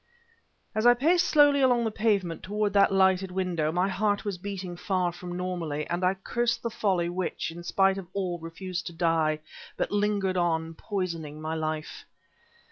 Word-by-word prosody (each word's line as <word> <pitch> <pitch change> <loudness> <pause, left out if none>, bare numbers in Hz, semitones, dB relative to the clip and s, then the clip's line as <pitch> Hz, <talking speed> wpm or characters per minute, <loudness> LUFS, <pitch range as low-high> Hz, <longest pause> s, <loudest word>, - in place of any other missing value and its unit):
As 215 +2 +2
I 245 - +8
paced 335 +8 +3
slowly 290 -2 +5
along 245 -2 +4
the 225 - -1
pavement 200 -6 0
toward 205 +1 -1
that 200 -1 +5
lighted 190 0 +3
window, 180 -4 -1
my 180 +3 +1
heart 205 +2 0
was 200 -4 -3
beating 190 -2 -5
far 180 -1 0
from 175 0 -7
normally, 170 -5 -3
and 175 +1 -2
I 185 +1 +3
cursed 235 +4 -1
the 235 - -2
folly 190 -6 0
which, 175 -1 -3
in 170 +1 -9
spite 195 +2 +2
of 185 - -9
all, 185 -3 -2
refused 175 +2 -5
to 170 - -6
die, 165 -2 +1 0.4
but - - -1
lingered 205 -2 +1
on, 165 -2 0
poisoning 165 -6 -4
my 155 +1 -3
life. 155 -1 -4
185 Hz, 175 wpm, -27 LUFS, 170-205 Hz, 0.4 s, I